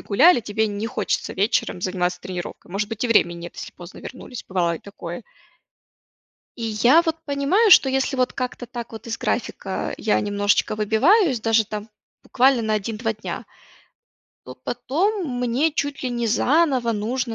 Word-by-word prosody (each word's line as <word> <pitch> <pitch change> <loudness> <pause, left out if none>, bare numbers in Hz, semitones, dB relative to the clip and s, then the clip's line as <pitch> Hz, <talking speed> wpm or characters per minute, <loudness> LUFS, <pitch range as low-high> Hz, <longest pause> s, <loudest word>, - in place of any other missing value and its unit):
гуляли, 280 - +5
тебе 220 0 -1
не 205 +1 -3
хочется 250 - -2
вечером 205 -2 0
заниматься 180 -1 -1
тренировкой. 180 -1 -7
Может 205 +1 -1
быть, 225 +1 -3
и - - +2
время 210 -6 +4
нет, 170 0 -9
если - - -8
поздно 175 +1 -12
вернулись, 255 -1 -9
бывало 175 -3 +1
и - - -6
такое. 175 -1 -8 1.4
И 230 - -4
я 240 +9 +4
вот 325 -2 -1
понимаю, 295 +10 +2
что 270 - +8
если 270 +1 0
вот 255 -1 +1
как-то 250 -2 -4
так 235 -1 -7
вот 225 +1 -9
из 230 0 -4
графика 195 -5 -2
я 215 - +2
немножечко 205 +1 +1
выбиваюсь, 255 - +3
даже 225 0 +2
там 210 0 -6 0.3
буквально 260 -1 +3
на 220 -1 -1
1-2 220 +2 -1
дня, 215 0 -6 1.0
то - - -9
потом 335 - -1
мне 250 +6 +1
чуть 285 -2 -3
ли 255 - -1
не 240 -1 -1
заново 260 0 +2
нужно 230 +3 -2
230 Hz, 165 wpm, -22 LUFS, 205-265 Hz, 1.4 s, что